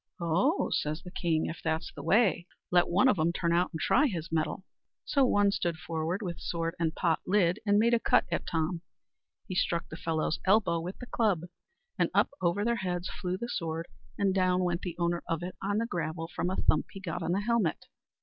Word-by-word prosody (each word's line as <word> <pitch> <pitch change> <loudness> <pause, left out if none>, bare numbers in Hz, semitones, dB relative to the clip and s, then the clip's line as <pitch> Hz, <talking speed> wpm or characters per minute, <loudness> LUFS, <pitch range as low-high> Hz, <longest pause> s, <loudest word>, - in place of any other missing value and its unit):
"Oh!" 180 - +1
says 155 +2 -1
the 180 - -9
king, 165 -4 0
"if 165 - -5
that's 160 0 -2
the 140 - -8
way, 185 +1 +3 0.2
let 175 0 +4
one 200 +9 +4
of 205 -9 +3
'em 160 +2 +3
turn 170 -1 0
out 175 +1 +2
and 160 - -5
try 295 - +4
his 165 - -4
mettle." 160 +3 -1 0.4
So 275 - +3
one 205 -4 +3
stood 170 -4 -1
forward, 165 +5 -3
with 175 -3 -4
sword 165 -1 -2
and 160 -2 0
pot 165 -3 +1
lid, 185 -1 +3
and 205 0 +5
made 230 +3 +4
a 235 - +4
cut - - +3
at 170 - -2
Tom. 165 +1 -1 0.7
He 190 - -4
struck 170 -2 0
the - - -7
fellow's 165 0 -1
elbow 195 -4 +3
with 180 +3 -6
the 250 - -8
club, 215 -8 +1 0.6
and - - +3
up - - +4
over 180 +4 +1
their 235 0 +1
heads 180 -3 -2
flew 180 -1 -3
the 235 - -4
sword, 165 -5 -3 0.3
and 195 -2 +2
down 185 -1 +2
went 175 -1 0
the 175 -3 -5
owner 170 0 0
of 165 +1 -1
it 180 - -5
on 205 +1 0
the 230 - +1
gravel 165 -5 -3
from 180 - 0
a 190 - -1
thump 155 - +2
he 195 - -7
got 180 -2 -4
on 170 +1 0
the 195 - +1
helmet. 220 -6 0
175 Hz, 220 wpm, -30 LUFS, 165-200 Hz, 0.7 s, and